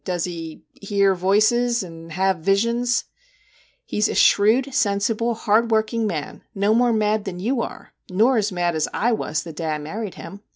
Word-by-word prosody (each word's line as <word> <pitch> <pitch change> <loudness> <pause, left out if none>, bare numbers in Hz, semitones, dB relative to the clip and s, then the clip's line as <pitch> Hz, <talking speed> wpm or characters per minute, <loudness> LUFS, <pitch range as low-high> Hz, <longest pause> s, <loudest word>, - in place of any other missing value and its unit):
' - - -49
Does 180 -3 -2
he 165 -3 -6
" - - -54
hear 200 -1 +2
voices" 215 +6 +2
and 165 -2 -11
"have 190 0 +1
visions" 235 +7 +1 0.3
?' - - -34
* - - -38
He 210 - -3
's - - +4
a - - -3
shrewd, 240 +7 +4
sensible, 220 +2 0
hard 225 +1 +2
working 220 0 +1
man 155 -7 -5
no 200 +2 +2
more 240 +1 +3
mad 215 -1 0
than 180 -3 -5
you 235 +6 -1
are, - - -8 0.2
nor 225 +7 +3
as 210 -1 0
mad 175 -1 0
as 155 -1 0
/ - - -27 0.2
was 155 - -3
the 165 - -9
day 160 +1 -5
I - - -3
married 190 +7 -6
him. 200 +1 -10
205 Hz, 205 wpm, -22 LUFS, 180-230 Hz, 0.3 s, s